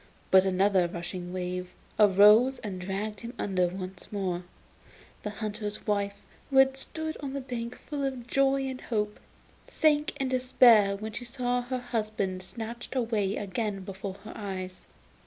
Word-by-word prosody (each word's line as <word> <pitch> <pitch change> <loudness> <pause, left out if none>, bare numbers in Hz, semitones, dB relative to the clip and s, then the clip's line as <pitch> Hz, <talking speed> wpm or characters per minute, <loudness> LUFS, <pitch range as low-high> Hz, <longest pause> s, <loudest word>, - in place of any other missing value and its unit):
But 190 0 +7
another 190 -1 +3
rushing 175 +1 -6
wave 180 0 -4 0.3
arose 210 +6 +7
and 190 -4 -4
dragged 200 +3 -3
him 235 +3 -7
under 185 -3 +1
once 185 +1 -7
more. 185 -3 -2 0.8
The 210 - -3
hunter's 210 0 -5
wife, 200 -1 -1 0.3
who 270 - +1
had 265 0 +6
stood 315 +3 -4
on 275 -2 -5
the 280 - -2
bank 245 -2 -5
full 290 -2 -5
of 260 -3 -3
joy 275 +2 +2
and 260 -1 -5
hope, 210 -2 -2 0.5
sank 300 -1 +2
into 260 -1 +1
despair 230 -5 +6
when 215 +2 -5
she 245 +3 -6
saw 245 +1 0
her 250 +1 -3
husband 215 -6 -2
snatched 230 +6 -6
away 220 -5 0
again 200 0 -2
before 195 0 -6
her 220 - -7
eyes. 185 -3 -6
210 Hz, 155 wpm, -29 LUFS, 190-250 Hz, 0.8 s, But